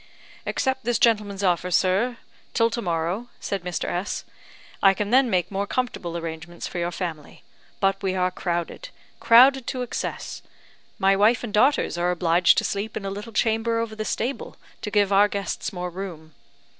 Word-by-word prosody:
"Accept 265 -1 -1
this 240 -1 +1
gentleman's 210 -4 +1
offer, 180 -1 +1
sir, 195 +7 +2 0.4
till 230 0 +3
to 235 - -2
morrow," 175 +6 -2
said 200 -2 -3
Mr. 180 -2 -3
S, 180 +3 -3 0.6
"I 195 -1 +6
can 210 +1 -2
then 260 0 +5
make 185 -3 0
more 200 +1 -2
comfortable 200 -9 -2
arrangements 165 +1 -6
for 175 - -4
your 170 0 0
family; 170 -4 -6 0.4
but 195 0 +1
we 190 -2 -1
are 185 0 +1
crowded 175 - -3 0.3
crowded 260 +2 +6
to 255 -1 -2
excess. 245 - -5 0.6
My 195 0 +4
wife 215 +5 +3
and 220 -4 -5
daughters 250 -5 +3
are 175 +1 +1
obliged 175 0 +3
to - - +3
sleep 205 +2 -3
in 195 - -5
a 195 - -2
little 205 +4 -7
chamber 225 +1 +1
over 230 -1 -2
the 215 - -3
stable, 245 +5 -3 0.2
to 210 - -4
give 205 -1 +2
our 200 +1 +6
guests 200 -1 -3
more 180 -2 -4
room. 170 -4 -8
200 Hz, 175 wpm, -24 LUFS, 180-230 Hz, 0.6 s, I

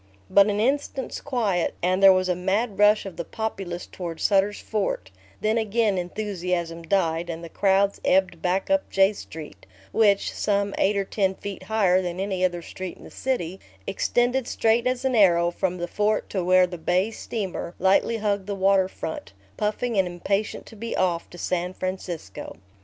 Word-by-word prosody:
But 200 0 +6
an 205 0 0
instant's 270 +2 -1
quiet, 220 -11 0
and 185 +2 +2
there 195 -1 +9
was 185 0 +2
a 180 - +1
mad 195 +4 -1
rush 210 0 +5
of 190 -3 -8
the 170 - -3
populace 195 -4 -4
toward 170 -3 -7
Sutter's 200 0 +2
Fort; 195 - -2 0.3
then 220 +2 +2
again 215 -2 +1
enthusiasm 180 -3 -3
died, 170 -1 0
and 165 0 -5
the 170 - -7
crowds 195 +2 +2
ebbed 185 -3 +2
back 190 +8 0
up 290 0 +2
J 195 +1 +4
Street, 155 - -10 0.2
which, 205 -3 +3
some 200 -1 0
eight 200 +1 +2
or 200 - 0
ten 190 -1 0
feet 200 -1 -7
higher 190 -3 +3
than 175 0 -4
any 190 -1 -1
other 175 -2 0
street 185 +1 -7
in - - -15
the - - -12
city, 195 -9 -2 0.3
extended 245 +5 +1
straight 230 +2 +2
as 255 +1 -1
an 260 - +1
arrow 175 -6 +4
from 180 +1 -2
the 175 0 -3
fort 210 +4 0
to 190 -3 -1
where 185 +1 +5
the 175 -1 -7
bay 185 +6 +1
steamer 195 -6 -5
lightly 195 +5 +3
hugged 205 -2 -1
the 200 - -2
water 195 -1 +3
front, 160 - -6 0.2
puffing 215 +1 -1
and 190 - +3
impatient 195 +4 -2
to 225 - -13
be 230 +2 -4
off 175 -2 0
to 175 - -12
San 180 +1 -2
Francisco. 180 - -5
195 Hz, 180 wpm, -25 LUFS, 180-210 Hz, 0.3 s, there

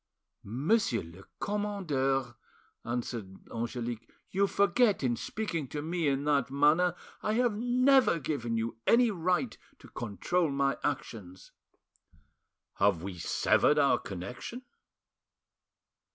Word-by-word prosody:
"Monsieur 135 - +1
le 85 +4 -13
commandeur," 145 -12 -1 0.5
answered 120 -4 -4 0.2
Angelique, 115 0 -4 0.2
"you 200 +1 +2
forget, 200 - +3
in 120 -2 +1
speaking 165 - -3
to 145 +3 -5
me 165 0 -1
in 140 0 +1
that 145 -3 +2
manner, 150 +6 +3 0.3
I 215 - 0
have 240 -1 +2
never 250 -1 +4
given 125 -6 -2
you 115 0 -3
any 235 0 +5
right 170 - 0 0.2
to - - -15
control 120 - -1
my 140 0 0
actions." 95 -5 -5 1.3
"Have 100 -4 +2
we 95 -2 -6
severed 150 - +3
our 140 -2 +4
connection?" 120 - -7
140 Hz, 110 wpm, -30 LUFS, 115-195 Hz, 1.3 s, any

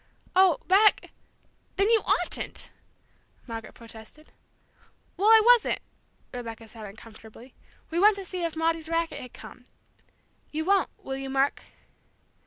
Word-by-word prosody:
"Oh, 370 -4 +5
Beck 410 +3 +4 0.6
then 395 +1 +2
you 455 - +5
oughtn't!" - - -2 0.7
Margaret 225 -2 -8
protested. 230 +6 -14 0.8
"Well, 400 - 0
I 445 0 +8
wasn't!" 485 -1 +4 0.5
Rebecca 230 -2 -7
said 215 -1 -9
uncomfortably. 220 +3 -14 0.4
"We 335 - 0
went 415 +2 +6
to 395 -1 -8
see 360 -1 -5
if 330 -1 -2
Maudie's 325 0 -1
racket 330 0 -1
had 250 - -10
come. - - -12 0.9
You 315 +1 -3
won't 395 +1 +2
will 265 0 -6
you, 270 0 -6
Mark?" 270 +1 0
315 Hz, 130 wpm, -26 LUFS, 235-380 Hz, 0.9 s, I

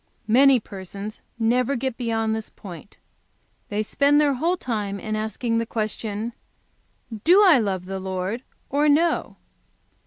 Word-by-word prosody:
Many 260 +3 +6
persons 200 +1 -8 0.2
never 245 +4 +2
get 260 -1 -2
beyond 225 -2 -1
this 220 -1 -4
point. 185 0 -11 0.7
They 210 +1 -1
spend 285 +6 +3
their 290 -2 +3
whole 335 +8 0
time 210 - -3
in 215 +1 -3
asking 230 +2 -1
the 230 - -1
question: 220 0 -3 0.9
"'Do 370 +6 +6
I 350 -9 +7
love 190 -5 -2
the 190 +1 -4
Lord 190 +4 -3 0.3
or 295 +2 +3
no? 330 +4 +2
225 Hz, 135 wpm, -24 LUFS, 205-270 Hz, 0.9 s, I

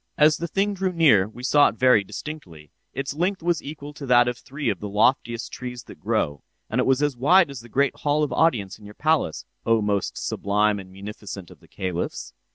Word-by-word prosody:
"'As 150 0 +5
the 170 - -3
thing 200 +5 0
drew 190 -1 -1
near 140 - +4
we 120 +3 -12
saw 145 +2 +5
it - - -3
very 125 -3 +4
distinctly. 100 - -9 0.2
Its 140 +1 -4
length 180 +4 -1
was 170 -2 +1
equal 145 0 -8
to 145 -1 -8
that 120 -1 +5
of 125 - -1
three 140 +3 -6
of 105 - 0
the 105 - -5
loftiest 115 +2 +1
trees 125 -2 -6
that - - -13
grow, 70 -1 -1 0.3
and 115 - 0
it - - 0
was 135 +2 +3
as 145 -3 +1
wide 165 +6 +4
as 135 - -7
the 120 - -14
great 140 +3 +1
hall 150 +1 +1
of 150 - -1
audience 110 - +1
in 105 - -14
your 105 0 -12
palace, 155 - 0 0.2
O 115 0 +3
most 105 -2 -1
sublime 105 +1 0
and 95 -1 -11
munificent 100 -1 -8
of - - -15
the - - -21
Caliphs. 90 -2 -4
125 Hz, 220 wpm, -24 LUFS, 105-150 Hz, 0.3 s, As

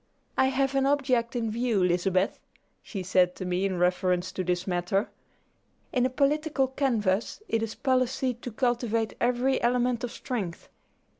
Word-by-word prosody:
"I - - +4
have 270 +1 +1
an 270 0 +2
object 260 -4 +1
in 225 -2 -1
view, 230 -4 +1
Lizabeth," 185 +2 +1 0.4
she 195 -4 -6
said 180 -1 +3
to 185 - -6
me 180 +2 0
in 190 -2 -1
reference 180 0 +1
to 185 - -3
this 180 0 -1
matter. 180 +3 0 0.8
"In 250 -1 +3
a - - -5
political 280 0 +1
canvass 230 -7 0
it 225 - 0
is 225 -1 -3
policy 255 0 +1
to 245 +1 -8
cultivate 230 -2 0
every 250 +2 +2
element 245 0 +1
of 245 - -3
strength. 205 -10 -5
235 Hz, 155 wpm, -27 LUFS, 185-255 Hz, 0.8 s, I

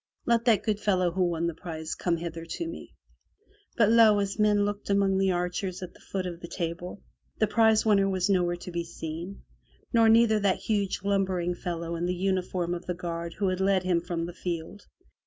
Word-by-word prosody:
Let 235 0 +2
that 230 -4 +4
good 210 -2 0
fellow 185 -4 +1
who 185 +2 0
won 170 -1 0
the 170 - -1
prize 160 -1 -6
come 170 -2 -1
hither 165 0 -6
to 165 - -5
me/' 330 0 -8 0.8
But 225 -2 +4
lo! 225 -2 +6
as 200 +1 -2
men 210 -1 +3
looked 205 0 -4
among 195 -1 +2
the 195 0 +2
archers 180 +1 -2
at 180 - -8
the - - -19
foot 190 -1 -4
of 175 -2 -5
the 170 - -8
table, 175 +2 -5 0.3
the 215 - +3
prize 220 0 +3
winner 200 -2 +4
was 185 -1 0
nowhere 180 -3 +2
to 175 +1 -9
be 170 0 -2
seen, 170 +3 -7 0.5
nor 230 -1 +5
neither 225 -1 +5
that 200 -2 +2
huge 205 -3 -1
lumbering 190 -3 0
fellow 170 -1 -4
in 170 +1 -2
the 180 - -1
uniform 180 -1 -1
of 175 0 -6
the 180 - -2
guard 170 -1 -5
who 195 -2 0
had 185 0 -2
led 190 -1 +2
him 180 -2 +1
from 170 -1 -3
the 175 - -7
field. 175 +2 -5
185 Hz, 210 wpm, -27 LUFS, 175-205 Hz, 0.8 s, lo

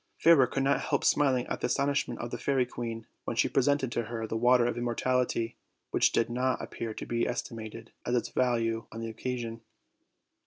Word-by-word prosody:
Fairer 155 -6 +6
could 135 - -1
not 135 - +2
help - - 0
smiling 130 -4 +3
at - - -4
the - - +1
astonishment 140 -3 0
of 120 - -5
the - - -4
fairy 135 -2 +2
queen 115 -2 -5 0.2
when - - -2
she - - +3
presented 135 -1 +2
to 120 -1 -1
her 115 0 -4
the 110 - -4
water 120 +1 +4
of 120 - 0
immortality, 120 -1 0 0.3
which - - +3
did 115 - +2
not 125 +2 0
appear 115 -1 -5
to - - -6
be 120 0 0
estimated 115 -2 -5
at 120 - 0
its 120 - 0
value 115 -3 0
on 115 - -7
the 115 - -3
occasion. 115 0 -4
120 Hz, 195 wpm, -29 LUFS, 115-130 Hz, 0.3 s, Fairer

